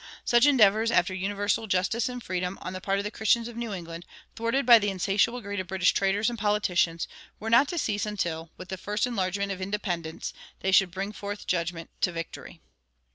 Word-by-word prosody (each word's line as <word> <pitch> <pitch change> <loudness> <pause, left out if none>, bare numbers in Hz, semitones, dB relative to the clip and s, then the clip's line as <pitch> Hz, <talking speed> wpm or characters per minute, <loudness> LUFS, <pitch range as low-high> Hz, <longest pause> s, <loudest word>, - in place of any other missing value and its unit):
Such 240 +3 +5
endeavors 220 -4 +5
after 185 -4 +2
universal 205 +3 -1
justice 195 +6 +1
and 245 -1 -6
freedom, 180 +1 -3
on 185 - -5
the 185 - -6
part 195 +1 0
of 200 - -1
the 210 - -4
Christians 230 +1 +2
of 240 - -9
New 235 -2 -4
England, 170 -3 -6 0.3
thwarted 230 +4 0
by 235 -2 +9
the 205 -1 0
insatiable 200 +6 +1
greed 205 -2 -4
of 185 - -4
British 185 0 +2
traders 200 +2 +1
and 240 -2 -2
politicians, 185 -5 +1 0.3
were 225 +1 -4
not 235 +5 +6
to 345 - -4
cease 215 -7 -1
until, 170 -6 -3
with 185 - -10
the 190 - -4
first 210 +4 -1
enlargement 200 -4 -1
of 190 -1 -5
independence, 180 -5 -3 0.3
they 190 - 0
should 190 0 +5
bring 195 +3 -4
forth 205 0 -6
judgment 170 -1 -2
to 180 - +2
victory. 165 -1 -7
200 Hz, 200 wpm, -27 LUFS, 185-220 Hz, 0.3 s, by